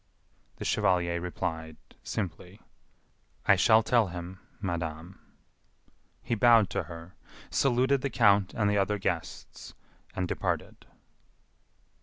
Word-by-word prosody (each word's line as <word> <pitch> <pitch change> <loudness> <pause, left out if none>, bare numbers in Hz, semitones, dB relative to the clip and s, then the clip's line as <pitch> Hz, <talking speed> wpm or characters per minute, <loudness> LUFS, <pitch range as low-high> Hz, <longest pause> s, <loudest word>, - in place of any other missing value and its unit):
The - - -7
chevalier 85 -2 +1
replied, 80 -3 -4 0.2
simply: 90 -1 -5 0.9
"I 100 - +6
shall 110 +3 +5
tell 115 -1 +3
him, 90 +1 -8 0.2
madame." 85 -1 -5 1.0
He - - -2
bowed 115 -2 +5
to - - -1
her, 85 +2 -10 0.4
saluted 130 +1 +2
the 140 - -1
count 100 -6 +3
and 105 -2 +1
the 100 0 +2
other 100 +2 0
guests, 85 -4 -5 0.4
and 90 -1 -1
departed. - - -3
95 Hz, 110 wpm, -28 LUFS, 85-110 Hz, 1.0 s, I